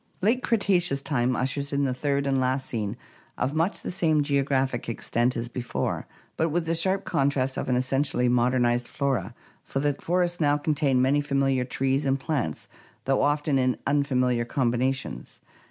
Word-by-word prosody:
Late 235 +5 +3
Cretaceous 185 - +1
time 130 -3 0
ushers 140 +2 -1
in 140 0 +1
the 130 -2 0
third 140 +2 -1
and 135 -1 +1
last 130 +1 0
scene, 110 -1 -3 0.4
of 130 +3 -1
much 165 +5 -1
the - - -3
same 160 -5 +2
geographic 135 -4 0
extent 120 +2 0
as 115 +1 -3
before, 125 0 -3 0.3
but 160 - +1
with 165 +2 0
the 165 - 0
sharp 190 +4 +2
contrast 135 -1 0
of - - -3
an 125 - +2
essentially 130 0 +1
modernized 120 0 +2
flora, 125 -6 -2 0.3
for 135 - -3
the 145 +1 +1
forests 175 +3 -1
now 145 -2 +3
contain 145 -4 +1
many 140 +3 +3
familiar 135 -3 +1
trees 135 +2 0
and 135 0 +1
plants 130 - -3 0.4
though 135 0 +2
often 145 0 +1
in 130 -1 +1
unfamiliar 130 -4 +1
combinations. 130 +2 -2
135 Hz, 165 wpm, -26 LUFS, 125-145 Hz, 0.4 s, Late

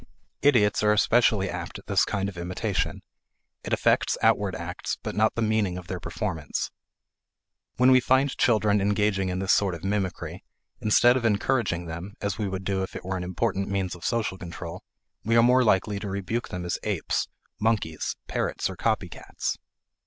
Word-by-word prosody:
Idiots 115 -8 +4
are 105 0 +4
especially 105 -2 +3
apt - - -5
at - - -14
this - - +3
kind 100 -1 -1
of 100 - -7
imitation; 85 +1 -2 0.6
it - - -6
affects - - +2
outward - - +3
acts - - -4
but - - -3
not 110 +1 +2
the 115 - 0
meaning 105 -4 +1
of 90 - -8
their 90 0 -5
performance. 85 -3 -3 1.0
When 125 +1 +5
we 130 - +7
find 130 +2 +2
children 105 -3 +3
engaging 100 -1 +1
in 90 - -2
this 95 0 +2
sort 95 -4 +2
of 85 - -11
mimicry, 95 -2 -3 0.4
instead 120 +4 +5
of 125 - -3
encouraging 105 -4 +1
them 85 +5 -7
(as 100 0 -3
we 105 - 0
would 95 0 -4
do 95 0 -1
if 95 - -5
it - - -7
were 95 +1 -2
an 90 - -4
important 95 +2 -1
means 95 -2 -1
of 90 -2 -11
social 110 -5 -1
control) 85 -1 -7 0.4
we 115 +1 +1
are 115 - +6
more 125 +1 +5
likely 100 -1 +2
to 100 - -5
rebuke 100 +5 -3
them 90 -1 -5
as 90 - -2
apes, - - -1 0.3
monkeys, 105 -8 0
parrots, - - -1
or - - -8
copy - - 0
cats. - - -5
100 Hz, 180 wpm, -26 LUFS, 90-110 Hz, 1.0 s, we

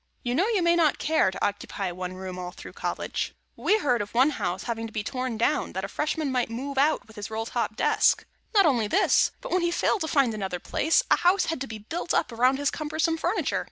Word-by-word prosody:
You 245 -1 -1
know, 360 +11 +2
you 425 -6 +1
may 340 0 +4
not 320 -4 +3
care 315 -9 +2
to 185 - -2
occupy 200 -2 -3
one 180 +1 -5
room 185 -1 -7
all 180 0 -4
through 180 - -11
College. - - -3 0.2
We 430 - +2
heard 250 - +1
of 205 +2 -7
one 265 +5 +5
house 185 -8 -3
having 230 -1 -3
to - - -12
be 215 -1 -3
torn 255 0 -3
down, 230 - 0
that 190 - -3
a - - -2
Freshman 300 +5 -2
might 250 -3 0
move 265 +4 -3
out 300 +3 +2
with 220 0 -17
his 205 +1 -5
roll 220 +1 -3
top - - -2
desk. - - +3 0.3
Not 400 -2 +6
only 240 -8 +2
this, - - +3
but - - -7
when 365 - +2
he 345 - +1
failed 360 +3 +1
to 315 - -1
find 275 -7 +2
another 190 -4 -3
place, 325 - +2
a - - +6
house 360 +1 +3
had 325 -5 -3
to 270 - -3
be 220 - -6
built 320 +12 -3
up - - +1
around 250 +3 +3
his 285 0 0
cumbersome 315 +2 -1
furniture. 345 +5 0
255 Hz, 245 wpm, -26 LUFS, 215-320 Hz, 0.3 s, Not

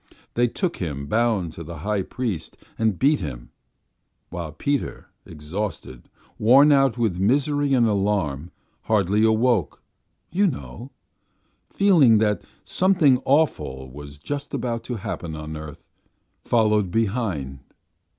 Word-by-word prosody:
They 120 +1 +2
took 175 - -3
Him 75 -5 -4
bound 105 -1 0
to 85 - -8
the 85 +1 -8
high 105 -2 0
priest 95 -6 -4 0.2
and 110 -4 +1
beat 145 +1 +3
Him, 65 -9 -7 0.8
while 85 -3 -5
Peter, 140 - -3 0.2
exhausted, 75 - -6 0.3
worn 135 +7 +6
out 135 -4 +3
with 110 -7 0
misery 140 +6 +2
and 120 -2 +4
alarm, 95 -8 -1 0.4
hardly 105 0 +2
awake, 110 -6 +2 0.6
you 200 +3 +3
know, 115 - -6 0.8
feeling 165 - +5
that 105 -1 +1 0.2
something 165 -9 +3
awful 75 - 0
was 70 +1 -10
just 145 - -5
going 120 -2 -2
to 120 - -6
happen 95 -6 -5
on 75 0 -7
earth, 75 -2 -9 0.6
followed 105 -4 +2
behind.... 95 - -2
105 Hz, 120 wpm, -23 LUFS, 80-125 Hz, 0.8 s, worn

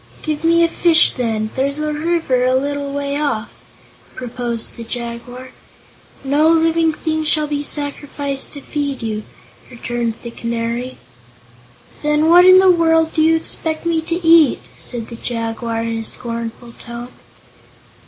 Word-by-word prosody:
"Give 305 0 -3
me 335 +1 +4
a - - +5
fish, 335 -1 +4
then; 220 -3 -2
there's 280 +2 -1
a 305 0 -2
river 310 -5 0
a 255 0 +2
little 285 +1 -2
way 280 0 -2
off," 235 -7 -2 0.6
proposed 240 -2 -3
the 235 - -7
Jaguar. 240 +2 -6 0.7
"No 290 +3 +3
living 325 0 +3
thing 315 0 -2
shall 305 0 +1
be 290 -1 -2
sacrificed 285 -1 -3
to 285 - -8
feed 285 -4 -3
you," 215 -1 -2 0.5
returned 240 -2 -3
the 235 - -6
Canary. 235 +2 -3 1.0
"Then 300 +1 +2
what 355 +1 +8
in 370 0 +9
the 375 0 +6
world 325 -2 +3
do 315 - +1
you 325 +1 +4
expect 320 0 -3
me 330 -1 +1
to 330 +1 -2
eat?" 325 -4 +6
said 235 -3 -5
the 235 - -7
Jaguar 230 -1 -3
in 230 0 -2
a - - -4
scornful 235 0 -6
tone. 235 +1 -8
280 Hz, 150 wpm, -18 LUFS, 235-315 Hz, 1.0 s, in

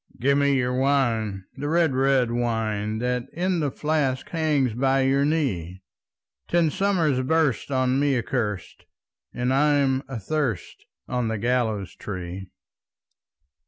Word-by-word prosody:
"Give 140 +3 +3
me 140 0 +3
your 125 -1 0
wine, 120 -7 0
the 145 - -4
red, 165 -3 +2
red 130 -2 +2
wine, 110 -3 -1
That 125 +1 -2
in 180 +1 0
the 150 -3 0
flask 145 -3 -1
hangs 150 -7 +1
by 135 +3 +2
your 135 +1 +2
knee! 95 - -1 0.6
Ten 170 -3 +2
summers 170 -10 +1
burst 150 -2 +1
on 130 -1 +1
me 140 -2 +2
accurst, 110 -6 -3 0.5
And 125 +1 -1
I'm 140 -2 +3
athirst 130 - -3 0.2
on 125 -2 -1
the 110 0 -2
gallows 110 -4 -1
tree." 95 -1 -6
130 Hz, 125 wpm, -24 LUFS, 115-145 Hz, 0.6 s, Give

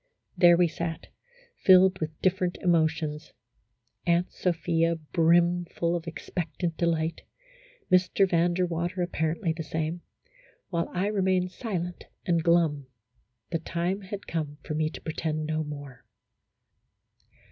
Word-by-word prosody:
There 175 -2 +6
we 175 0 +4
sat, 165 0 -5 0.5
filled 185 0 +6
with 155 -1 -4
different 185 -1 +1
emotions: 160 -3 0 0.7
Aunt 170 +1 +2
Sophia 165 -1 +1
brimful 170 +2 +2
of 170 0 -4
expectant 165 +1 -4
delight, 165 -1 0 0.7
Mr. 185 +2 +4
Van 175 -1 +2
der 180 0 +2
Water 175 +1 -2
apparently 165 0 -1
the 165 - -6
same, 160 +2 -3 0.7
while 170 -2 -1
I 180 +2 -1
remained 190 -3 +1
silent 180 -5 -4 0.2
and 170 -2 +2
glum; 160 -5 +2 0.6
the 165 - 0
time 175 +4 -2
had 200 +1 -7
come 150 -3 -3
for - - -4
me 155 0 0
to - - -10
pretend 155 -1 -3
no 155 0 -1
more. 145 -5 -9
170 Hz, 125 wpm, -27 LUFS, 160-180 Hz, 0.7 s, There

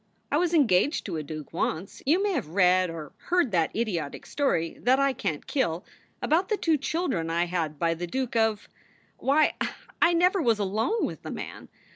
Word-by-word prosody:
I 290 - +3
was 345 +1 +1
engaged 280 - +3
to 175 -6 -3
a - - -2
duke 155 -1 -8
once 175 +5 -3
you 345 +7 +4
may 410 - +1
have 275 - -2
read 180 +1 +3
or 160 -3 -7
heard 350 -9 +2
that 170 -4 +2
idiotic 185 -10 -2
story 215 - -1
that 255 +3 +4
I 275 -1 +3
can 160 - -2
t - - -14
kill 180 - -1 0.4
about 345 +5 +2
the 425 - +1
two 320 -5 +1
children 280 - -1
I 170 +1 +1
had 165 -4 -2
by 165 +2 +1
the 175 +1 -5
Duke 255 +4 -3
of 220 -2 +1 0.5
Why, 300 +3 +3 0.5
I 345 - +5
never 360 +2 +3
was 230 -7 +3
alone 215 - 0
with - - -6
the - - -7
man! - - -7
220 Hz, 195 wpm, -27 LUFS, -, 0.5 s, I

